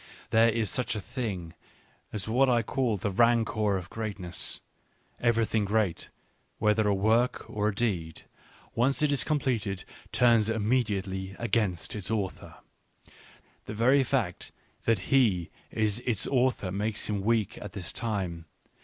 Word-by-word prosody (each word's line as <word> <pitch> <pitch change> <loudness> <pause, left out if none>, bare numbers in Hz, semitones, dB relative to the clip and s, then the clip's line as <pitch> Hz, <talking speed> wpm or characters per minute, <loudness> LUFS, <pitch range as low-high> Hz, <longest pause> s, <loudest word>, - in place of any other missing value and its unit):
There 115 +1 +5
is 115 -1 +1
such 115 -3 -1
a - - -2
thing 100 -7 -4 0.6
as 105 -1 -2
what 130 +4 +3
I 120 -2 +3
call 120 -2 0
the 100 +2 -2
rancour 110 -2 +3
of 90 0 -8
greatness: 100 -6 -3 0.6
every 115 -1 +3
thing 110 0 0
great, 100 -3 0 0.5
whether 105 0 +2
a 100 - +3
work 110 +5 +2
or 105 0 -1
a 105 - -1
deed, 90 -9 -2 0.5
.once 135 +6 +2
it 150 - +3
is 135 -3 +2
com 155 +2 +1
pleted, 105 -8 -1 0.3
turns 115 -3 +4
immediately 100 -4 -1
against 105 -7 0
its 100 -2 -4
author. 105 -4 -3 1.1
The 110 - -6
very 130 +5 +4
fact 120 -9 -1 0.3
that 115 +3 +1
he 105 -11 +3 0.2
is 110 0 0
its 120 -5 +1
author 125 -7 +1
makes 105 +2 -2
him 105 -2 -1
weak 110 0 0
at 105 - -8
this 95 -4 -5
time. 95 -8 -3
110 Hz, 145 wpm, -28 LUFS, 100-120 Hz, 1.1 s, There